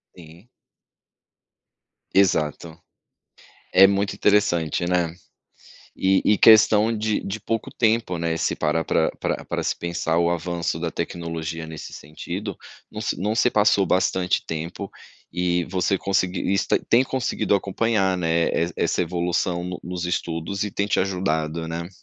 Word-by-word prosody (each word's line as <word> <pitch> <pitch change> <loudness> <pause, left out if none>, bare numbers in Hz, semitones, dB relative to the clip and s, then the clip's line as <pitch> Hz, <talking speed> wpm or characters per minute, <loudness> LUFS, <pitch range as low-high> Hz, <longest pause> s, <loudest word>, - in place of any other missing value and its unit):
Sim. 85 +6 -15 1.6
Exato. 85 -4 +1 1.0
É 95 - +8
muito 100 0 0
interessante, 85 -5 +2
né. 90 -2 0 0.8
E 95 0 +2
e 105 - +4
questão 110 0 +6
de 110 0 -1
de 100 +3 -5
pouco 115 +2 -3
tempo, 110 -6 +1
né, 85 0 -1
se - - 0
parar 80 +2 0
pra - - +1
pra - - -2
pra - - -3
se - - -1
pensar, 85 -1 -1
o 85 0 +2
avanço 85 -1 -2
da 85 0 -2
tecnologia 85 -2 -5
nesse 80 -1 -9
sentido 75 +2 -6 0.3
não - - -7
se - - -2
não 105 +4 -1
se 120 +2 +3
passou 105 -2 +3
bastante 95 0 +1
tempo, 85 +5 -5 0.4
e 90 0 0
você 95 +2 0
conseguir 95 -1 -1
isso 100 - 0
tá - - +3
tem 120 - +5
conseguido 130 -5 -1
acompanhar, 100 -1 +1
né, 85 -1 +1
es 85 +1 0
essa - - 0
evolução 85 0 -1
no 90 0 -5
nos 90 0 -5
estudos 90 +2 -2
e 105 - -4
tem 100 +1 -1
te 100 - +1
ajudado, 85 -4 -1
né. 85 +1 -5
90 Hz, 145 wpm, -23 LUFS, 85-100 Hz, 1.6 s, É